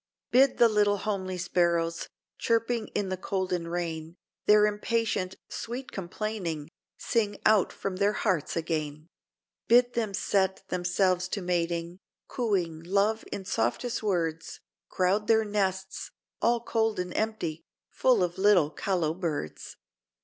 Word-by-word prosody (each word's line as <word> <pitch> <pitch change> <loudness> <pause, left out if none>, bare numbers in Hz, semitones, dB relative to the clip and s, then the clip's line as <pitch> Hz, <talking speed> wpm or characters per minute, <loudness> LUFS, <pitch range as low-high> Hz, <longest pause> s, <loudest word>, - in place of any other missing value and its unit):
"Bid 265 +2 +5
the 235 - +7
little 205 -2 +3
homely 190 -3 -3
sparrows, 170 -2 0 0.3
Chirping 230 0 +1
in 200 -2 0
the 185 - -2
cold 185 0 -2
and 170 -1 -2
rain, 165 -1 -4 0.3
Their 210 0 +7
impatient, 210 -3 -1
sweet 245 +3 -6
complaining, 175 -5 -4 0.3
Sing 210 -3 0
out 215 -3 +4
from 190 -2 -4
their 200 +2 +2
hearts 175 -7 0
again; 155 -1 -3 0.6
Bid 245 +1 +5
them 220 -4 -1
set 190 -1 0
themselves 180 0 +1
to 200 - -4
mating, 170 0 -1 0.3
Cooing 185 -9 -1
love 200 +5 +1
in 200 -2 -5
softest 225 - -1
words, 165 -6 -2 0.3
Crowd 195 +3 +1
their 220 -1 +4
nests, 190 -2 -2 0.3
all 235 0 +3
cold 225 -2 0
and 180 -1 -3
empty, 210 -8 -2 0.3
Full 245 -7 +3
of 175 +1 -3
little 190 -7 +4
callow 175 -5 0
birds." 160 - -4
190 Hz, 130 wpm, -28 LUFS, 170-215 Hz, 0.6 s, the